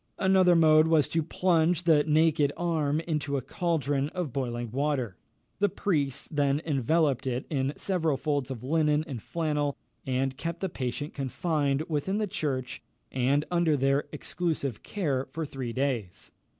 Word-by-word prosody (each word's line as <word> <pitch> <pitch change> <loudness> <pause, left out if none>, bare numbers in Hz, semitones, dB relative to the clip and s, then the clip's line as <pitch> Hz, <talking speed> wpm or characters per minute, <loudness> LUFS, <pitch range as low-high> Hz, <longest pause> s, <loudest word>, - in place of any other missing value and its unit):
Another 190 -2 +4
mode 155 -1 +6
was 160 -3 +4
to 165 - +1
plunge 170 0 +2
the 160 -3 +5
naked 155 -2 +3
arm 160 -3 0
into 150 -4 -2
a - - -2
caldron 145 -4 -1
of 175 -8 -3
boiling 120 -3 -3
water. 135 -6 -1 0.4
The 205 0 +3
priests 145 -8 -1
then 145 -2 +1
enveloped 145 -1 +1
it 125 0 -2
in 135 -1 0
several 165 -7 0
folds 145 -3 -1
of 125 -3 -6
linen 150 +1 +2
and 130 -8 -6
flannel, 150 -2 -1 0.3
and 130 0 -1
kept 170 +4 -4
the 190 - -1
patient 140 0 -4
confined 145 +1 0
within 160 +5 -1
the 215 - +1
church, 135 -9 -3 0.3
and 135 +4 +1
under 170 -4 +2
their 135 +2 +2
exclusive 155 -9 -3
care, 145 -10 -2
for 160 -1 -4
three 130 -4 -5
days. 120 -8 -3
150 Hz, 150 wpm, -28 LUFS, 135-165 Hz, 0.4 s, mode